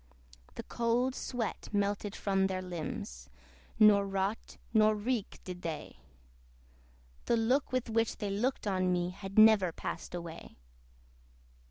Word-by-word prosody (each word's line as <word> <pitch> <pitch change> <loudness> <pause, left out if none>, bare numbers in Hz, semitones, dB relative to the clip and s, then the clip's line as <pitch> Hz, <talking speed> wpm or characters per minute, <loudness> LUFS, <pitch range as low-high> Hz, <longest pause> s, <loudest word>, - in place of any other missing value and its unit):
The - - -6
cold 240 +2 0
sweat 245 -4 -4
melted 205 0 -1
from 195 -1 +1
their 185 -1 -3
limbs, 200 +5 -6 0.5
Nor 205 -2 +6
rot 195 +2 -2 0.2
nor 215 -1 +5
reek 220 0 -2
did 180 -1 -7
they: 165 -3 -6 1.3
The 235 - +2
look 250 +6 +1
with 255 -1 -1
which 225 0 0
they 205 -1 -3
looked 240 +7 -1
on 185 -2 +1
me 175 0 0
Had 195 +1 -9
never 215 -5 +7
passed 170 - -6
away. 170 -1 -8
205 Hz, 130 wpm, -32 LUFS, 190-225 Hz, 1.3 s, never